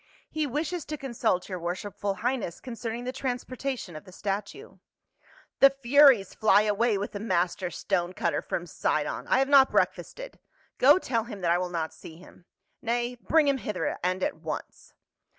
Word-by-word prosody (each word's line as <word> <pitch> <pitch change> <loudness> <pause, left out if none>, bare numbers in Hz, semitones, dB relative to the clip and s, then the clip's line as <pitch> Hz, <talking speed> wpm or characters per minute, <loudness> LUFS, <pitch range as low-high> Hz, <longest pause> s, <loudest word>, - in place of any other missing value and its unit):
" - - -31
He 310 -1 -1
wishes 310 +5 -2
to 305 - -5
consult 235 -9 -1
your 185 -2 -5
worshipful 195 +3 -3
highness 230 -4 -2
concerning 230 -1 -5
the 250 - -3
transportation 255 - -4
of 155 - -8
the 185 - -14
statue." 205 - -5 0.4
" - - -29
The 275 - +9
furies 270 -5 +5
fly 210 -1 +4
away 215 +1 +1
with 200 - -4
the 205 - -6
master 185 -3 0
stone 175 +1 -2
cutter - - -1
from - - -4
Sidon! - - -2
I - - +3
have 270 +1 +2
not 275 -1 +6
breakfasted. - - -2 0.4
Go 285 +6 +7
tell 230 -10 -1
him 210 -5 -8
that 170 -1 +1
I 175 - +3
will 180 0 -2
not 165 -2 -3
see 160 - -12
him. 180 0 -17 0.2
— - - -49
Nay, 240 +1 -1
bring 315 -2 +3
him 275 -1 +2
hither 185 -9 -3
and 185 +1 -1
at - - -1
once." 155 -2 -7
225 Hz, 185 wpm, -27 LUFS, 185-265 Hz, 0.4 s, The